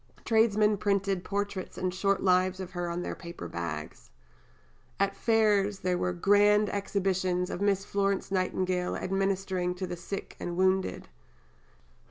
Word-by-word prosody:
Tradesmen 215 -2 +3
printed 195 -2 0
portraits 200 -1 -3
and 185 -1 -1
short 195 +1 +1
lives 185 0 +3
of 185 -1 -6
her 175 -2 -3
on 175 +1 -3
their - - -3
paper 170 - -8
bags. 75 -7 -6 0.9
At 200 0 +1
Fairs 210 -3 +2
there 180 0 +1
were 180 0 0
"Grand 205 +3 +4
Exhibitions 185 -2 0
of 180 - -4
Miss 200 -1 +1
Florence 200 -1 -1
Nightingale 185 -1 0
administering 190 -1 -1
to 185 +1 -3
the 180 -1 -5
Sick 180 +3 -6
and 175 0 -4
Wounded." 190 0 +1
190 Hz, 140 wpm, -29 LUFS, 180-200 Hz, 0.9 s, Grand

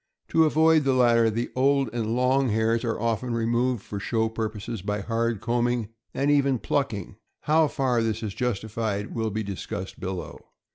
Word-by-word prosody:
To 160 0 +4
avoid 160 0 +4
the 135 -1 +2
latter, 120 -2 +4
the 115 +2 -2
old 135 +1 +3
and 115 -1 -1
long 130 +1 +2
hairs 110 +2 +1
are 115 -2 -1
often 115 +1 -1
removed 120 0 0
for 100 - -6
show 110 +2 0
purposes 110 -1 -4
by 105 +1 -2
hard 115 0 -1
combing, 120 -2 0 0.2
and 140 +2 +1
even 140 -2 +3
plucking. 110 -7 -2 0.2
How 155 +1 +3
far 130 -4 0
this 115 0 -1
is 105 -3 -3
justified 110 -3 -2
will 110 -1 -1
be 110 +1 -3
discussed 95 -1 -6
below. 95 -1 -5
115 Hz, 170 wpm, -26 LUFS, 110-130 Hz, 0.2 s, To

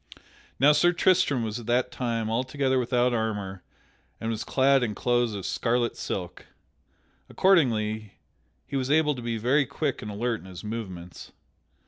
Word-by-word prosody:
Now 145 +2 +7
Sir 175 +4 +4
Tristram 175 -8 +2
was 110 +1 -3
at 120 - -10
that 120 +1 +1
time 115 -3 -2
altogether 130 +3 0
without 125 0 +1
armor 105 -4 -2 0.6
and 115 0 -2
was 110 0 -3
clad 135 0 +3
in 110 -4 -1
clothes 120 -3 +1
of 100 - -5
scarlet 120 0 0
silk. 90 -3 -5 0.8
Accordingly, 110 - +2 0.5
he - - -6
was 130 -1 -1
able 150 0 +3
to 125 - -7
be 115 -1 -2
very 130 +5 +2
quick 140 0 -2
and 105 - -6
alert 115 +2 -2
in 95 - -14
his 90 -2 -10
movements. 95 -6 -7
120 Hz, 155 wpm, -26 LUFS, 110-135 Hz, 0.8 s, Now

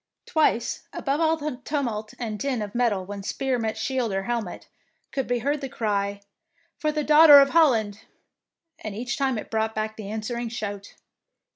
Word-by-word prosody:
Twice, 305 -7 0
above 280 +3 -1
all 320 0 +3
the 300 -4 -4
tumult 235 -8 -3
and 220 -3 -4
din 260 -5 -1
of 205 -1 -7
metal 225 -6 +1
when 200 +1 -6
spear 260 +5 -1
met 220 -1 -2
shield 245 0 -1
or 195 0 -1
hel 240 +2 -1
met, 185 -5 -9 0.4
could 270 -2 -2
be 245 - +1
heard 290 +1 0
the 270 - -4
cry, 200 -4 -2 0.3
" 335 0 -41
For 305 -2 0
the 300 0 -1
Daughter 300 0 +9
of 275 0 +4
Holland," 225 -11 +3 0.8
and 215 -2 -6
each 245 +3 -3
time 265 -3 0
it - - -7
brought 220 0 -1
the 215 -1 -4
answering 230 +2 -3
shout. 205 -3 -6
235 Hz, 180 wpm, -25 LUFS, 215-280 Hz, 0.8 s, Daughter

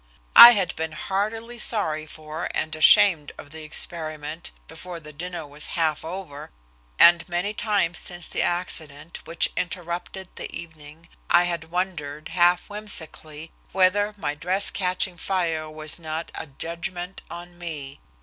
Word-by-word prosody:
I 240 +1 +13
had 190 -6 0
been 160 0 -4
heartily 220 +8 -3
sorry 155 -11 0
for 155 +1 -6
and 155 - -2
ashamed 160 -1 +5
of 145 - -12
the 160 0 -9
experiment 155 0 -4 0.2
before 180 -2 -9
the 150 -1 -13
dinner 175 +1 -6
was 145 +1 -7
half 155 -3 0
over, 160 -4 -7 0.5
and 170 +1 +6
many 175 +4 -1
times 205 -5 0
since 175 -2 -2
the - - +1
accident 165 -3 -4
which 165 - +2
interrupted 175 +2 -4
the - - -5
evening 160 0 -10 0.2
I 175 0 +6
had 170 -2 -2
wondered, 160 -4 -4
half 175 0 +3
whimsically, 160 -7 -4 0.2
whether 205 +3 +2
my 145 -7 -2
dress 180 +6 0
catching 180 -1 -1
fire 165 -4 -1
was 155 +1 -4
not 160 0 -5
a - - -6
"judgment 175 +5 -6
on 175 0 -10
me." 150 -5 -7
170 Hz, 140 wpm, -24 LUFS, 155-185 Hz, 0.5 s, I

